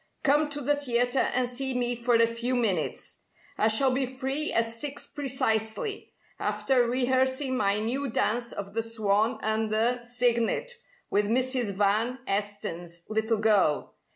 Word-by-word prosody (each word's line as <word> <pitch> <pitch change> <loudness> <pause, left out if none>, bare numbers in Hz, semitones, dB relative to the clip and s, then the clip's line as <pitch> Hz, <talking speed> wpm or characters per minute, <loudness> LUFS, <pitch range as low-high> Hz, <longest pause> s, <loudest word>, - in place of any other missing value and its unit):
Come 295 +1 +3
to 290 0 -4
the 290 +2 +2
theatre 245 -2 +1
and 250 0 0
see 260 +1 -1
me 245 0 +1
for 240 0 +1
a 230 0 +5
few 235 +2 -2
minutes. 200 -10 -1 0.4
I 215 - +2
shall 260 +5 +4
be 260 0 0
free 265 +4 0
at 230 0 +1
six 280 +5 -5
precisely, 255 - -2 0.3
after 250 -3 +1
rehearsing 260 +2 +1
my 205 -4 +1
new 255 +6 -1
dance 235 +1 0
of 200 0 -7
the 225 - 0
'Swan 220 +1 0
and 220 0 0
the 235 +3 +1
Cygnet' 245 - 0 0.4
with 205 0 +2
Mrs. 250 -2 +1
Van 210 +5 +1
Esten's 175 -4 -4
little 220 +1 0
girl. 205 -8 +2
240 Hz, 150 wpm, -27 LUFS, 220-260 Hz, 0.4 s, a